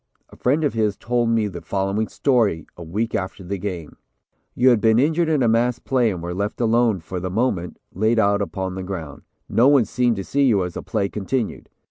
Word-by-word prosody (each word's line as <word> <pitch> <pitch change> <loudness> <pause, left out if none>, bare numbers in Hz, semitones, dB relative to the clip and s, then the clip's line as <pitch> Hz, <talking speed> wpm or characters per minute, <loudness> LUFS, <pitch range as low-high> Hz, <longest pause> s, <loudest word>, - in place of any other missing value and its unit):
A - - -15
friend 145 +6 +1
of 145 - +1
his 110 -3 0
told 120 -1 0
me 115 -2 +2
the 85 -4 -7
following 100 +2 -1
story 115 - +1
a - - -11
week 105 +8 -3
after 95 -2 -3
the 95 +2 -4
game: 90 -6 -6 0.6
"You 125 +1 +5
had 120 -4 +3
been 110 +1 +4
injured 160 +5 +2
in 150 -5 +2
a - - +3
mass 115 +2 +2
play 125 -3 +1
and 90 -5 -5
were 85 +1 -4
left 100 +3 -3
alone, 115 -4 +2
for 90 +3 -5
the 95 +1 -4
moment, 95 -4 -1 0.2
laid 110 +5 +1
out 100 -1 +3
upon 95 -2 -3
the 95 - -5
ground. 85 -6 -6 0.3
No 120 +3 +3
one 140 -5 +5
seemed 120 +2 +1
to 100 - -4
see 140 +7 +1
you 105 -7 +3
as 90 - -6
the - - -5
play 100 -3 -1
continued. 105 +4 -3
110 Hz, 220 wpm, -22 LUFS, 95-120 Hz, 0.6 s, You